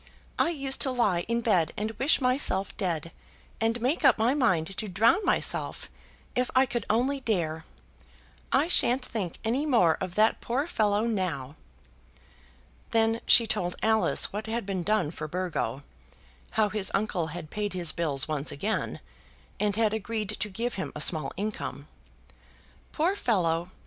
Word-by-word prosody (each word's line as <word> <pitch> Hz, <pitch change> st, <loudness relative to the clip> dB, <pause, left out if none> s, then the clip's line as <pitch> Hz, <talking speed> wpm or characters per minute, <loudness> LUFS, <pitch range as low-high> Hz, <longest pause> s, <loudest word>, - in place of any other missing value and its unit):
I -, -, +3 dB
used 275 Hz, -5 st, 0 dB
to 270 Hz, -, +4 dB
lie 205 Hz, -9 st, +1 dB
in 235 Hz, +1 st, 0 dB
bed 180 Hz, -9 st, +2 dB
and 215 Hz, +1 st, -2 dB
wish 270 Hz, +5 st, +3 dB
myself 250 Hz, -7 st, +1 dB
dead, 165 Hz, -4 st, -2 dB, 0.5 s
and 225 Hz, +1 st, +1 dB
make 260 Hz, +8 st, 0 dB
up -, -, +6 dB
my 230 Hz, +3 st, +2 dB
mind 195 Hz, -, +1 dB
to 215 Hz, -, -3 dB
drown 220 Hz, -, +3 dB
myself, 355 Hz, -, -1 dB, 0.4 s
if 250 Hz, 0 st, 0 dB
I 260 Hz, +1 st, +6 dB
could 240 Hz, -3 st, -4 dB
only 255 Hz, +6 st, +1 dB
dare. 165 Hz, -10 st, -2 dB, 0.9 s
I 285 Hz, +4 st, +3 dB
shan't 255 Hz, -6 st, +3 dB
think 200 Hz, -9 st, -4 dB
any 240 Hz, +6 st, 0 dB
more 180 Hz, -, +3 dB
of 185 Hz, -1 st, -4 dB
that 215 Hz, +1 st, +3 dB
poor 260 Hz, +5 st, -1 dB
fellow 210 Hz, -10 st, +1 dB
now." 180 Hz, -, -2 dB, 1.3 s
Then 225 Hz, 0 st, +2 dB
she 235 Hz, -, +7 dB
told 180 Hz, -5 st, -1 dB
Alice 220 Hz, -2 st, +3 dB
what 215 Hz, +2 st, -4 dB
had 230 Hz, -1 st, -2 dB
been 190 Hz, -2 st, -2 dB
done 190 Hz, -4 st, 0 dB
for 155 Hz, -2 st, -6 dB
Burgo; 155 Hz, -7 st, -3 dB, 0.7 s
how 215 Hz, -1 st, +3 dB
his 210 Hz, -2 st, +1 dB
uncle 195 Hz, -5 st, -1 dB
had 160 Hz, -1 st, -8 dB
paid 210 Hz, -1 st, -3 dB
his 175 Hz, -3 st, 0 dB
bills 145 Hz, -5 st, 0 dB
once 150 Hz, -2 st, -2 dB
again, 210 Hz, +10 st, -3 dB, 0.6 s
and 205 Hz, -2 st, +1 dB
had 220 Hz, -1 st, +2 dB
agreed 220 Hz, -1 st, -3 dB
to 210 Hz, 0 st, -2 dB
give 230 Hz, +5 st, -3 dB
him -, -, -5 dB
a -, -, -5 dB
small 155 Hz, -3 st, +2 dB
income. 205 Hz, -8 st, -4 dB, 1.0 s
"Poor 345 Hz, +6 st, +1 dB
fellow!" 175 Hz, -, 0 dB
210 Hz, 160 wpm, -27 LUFS, 175-235 Hz, 1.3 s, she